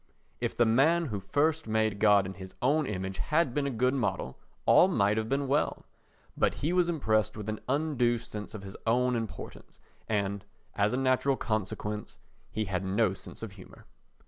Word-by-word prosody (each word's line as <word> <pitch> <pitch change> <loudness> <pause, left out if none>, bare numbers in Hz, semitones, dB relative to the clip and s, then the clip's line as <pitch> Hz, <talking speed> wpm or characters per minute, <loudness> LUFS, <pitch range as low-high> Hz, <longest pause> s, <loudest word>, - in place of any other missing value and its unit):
If - - -2
the 120 - +5
man 150 +10 +4
who 100 - -1
first 150 - 0
made 110 -2 +1
God 105 -2 +5
in 95 - -5
his 95 0 -10
own 145 +3 +2
image 95 -1 -4
had 150 - +1
been 145 0 0
a - - 0
good 125 +1 +1
model, 120 - -2 0.3
all 180 - +7
might 105 - +2
have 110 0 -2
been 140 0 0
well; 145 +3 0 0.5
but - - +1
he 155 +5 -1
was 180 -1 +3
impressed 110 -9 +1
with 105 -1 -6
an 110 - -3
undue 135 -5 +1
sense 110 -2 -7
of 100 - -7
his 95 0 -9
own 125 +2 +3
importance 115 -3 -7 0.3
and, 100 -2 -1 0.3
as 100 +3 +1
a - - +1
natural 130 +1 +2
consequence, 105 -1 -3 0.3
he 110 0 -2
had 95 -1 -2
no 95 +1 +1
sense 100 - -10
of 110 - -5
humour. 95 -2 -14
110 Hz, 185 wpm, -29 LUFS, 100-135 Hz, 0.5 s, all